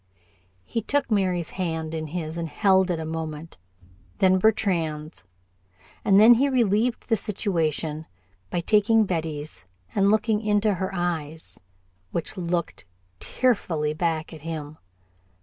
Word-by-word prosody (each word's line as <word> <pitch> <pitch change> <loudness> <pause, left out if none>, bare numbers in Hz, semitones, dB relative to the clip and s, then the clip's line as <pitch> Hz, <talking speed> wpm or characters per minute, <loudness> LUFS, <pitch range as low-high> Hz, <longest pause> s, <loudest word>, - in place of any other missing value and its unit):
He 230 - -3
took 280 +3 -1
Mary's 185 -5 +1
hand 160 -3 -3
in 160 -1 -3
his 160 0 -4
and 170 -1 -3
held 190 +1 +3
it 170 -2 -1
a 160 - -4
moment, 160 - -6 0.6
then 185 -1 +4
Bertrand's, 165 - 0 0.8
and 195 0 +5
then 225 +3 +9
he 270 +4 +2
relieved 235 -1 +1
the 225 - +3
situation 165 -7 -2 0.4
by 175 - -1
taking 215 +4 +4
Betty's 155 - -4 0.3
and 200 0 +3
looking 215 0 +2
into 210 -1 +2
her 190 0 -2
eyes, 165 -4 -3 0.5
which 170 - -1
looked 175 -2 -3 0.3
tearfully 165 -12 0
back 160 -1 -2
at 155 - -10
him. 155 -1 -6
175 Hz, 130 wpm, -25 LUFS, 160-210 Hz, 0.8 s, then